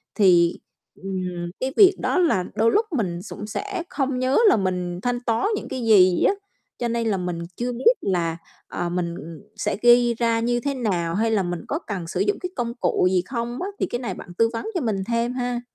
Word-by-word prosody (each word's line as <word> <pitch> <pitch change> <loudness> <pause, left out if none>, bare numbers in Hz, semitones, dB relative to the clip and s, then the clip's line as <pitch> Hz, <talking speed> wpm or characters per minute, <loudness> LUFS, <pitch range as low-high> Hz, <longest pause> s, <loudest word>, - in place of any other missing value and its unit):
thì, 175 -5 +4 0.4
ừm, 180 -2 -4
cái 260 +1 -2
việc 390 -2 +7
đó - - 0
là 325 - +2
đôi 225 +1 +3
lúc 440 +1 +3
mình 175 -6 -2
sũng 210 +1 -8
sẽ 380 - -4
không 270 -2 -1
nhớ 255 +2 +2
là - - +4
mình 180 -2 -2
thanh 245 0 -1
toán 230 - 0
những - - -5
cái 260 -3 -4
gì 185 -5 +5
á. - - +4 0.5
Cho 240 - 0
nên 230 -1 -1
là 200 -3 +1
mình 180 -2 -3 0.2
chưa 245 +1 -2
biết 355 - +4
là, 170 -3 -1 0.3
ờ, 175 - -3
mình, 170 -1 -2
ừm, 165 -1 -9
sẽ 205 - -2
ghi 240 0 +6
ra 230 0 +1
như 240 +1 +1
thế 280 +2 -2
nào 180 -9 -1
hay 225 +2 +1
là 200 -3 +2
mình 175 -1 -3
có 305 - -2
cần 190 - -5
sử - - -3
dụng 410 - +1
cái 360 - -4
công 235 -1 -2
cụ 180 - +2
gì 185 -1 +2
không 240 - -4
á. 375 - -2
Thì - - +1
cái 240 - -4
này 245 - -3
bạn 175 - -10
tư 230 0 +4
vấn 230 - -4
cho 350 - 0
mình 205 -5 -1
thêm 235 +1 0
ha. 245 -1 -2
230 Hz, 230 wpm, -23 LUFS, 180-245 Hz, 0.5 s, việc